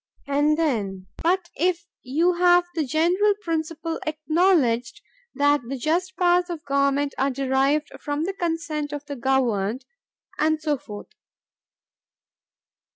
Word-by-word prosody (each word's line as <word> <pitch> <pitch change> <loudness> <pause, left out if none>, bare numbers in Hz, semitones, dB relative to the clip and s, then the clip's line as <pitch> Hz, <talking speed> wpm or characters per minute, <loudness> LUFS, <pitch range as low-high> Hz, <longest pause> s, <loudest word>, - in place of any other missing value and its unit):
and 290 +2 +2
then—"But 255 - -1
if 345 +2 0 0.2
you 320 +8 +1
have 355 0 +4
the 325 -2 0
general 350 +9 +2
principle 325 -1 -3
acknowledged 310 -5 +1 0.4
that 290 0 +3
the 270 +2 -4
just 350 +7 -1
powers 355 0 +3
of 335 -3 -6
government 280 0 +1
are 270 - +2
derived 275 +3 +1
from 290 +1 -2
the 385 +3 -2
consent 325 -4 -3
of 290 0 -6
the 285 -1 -6
governed."... 245 -3 0 0.5
and 310 0 +2
so 300 -3 -1
forth. 205 -3 -10
300 Hz, 120 wpm, -24 LUFS, 275-340 Hz, 0.5 s, have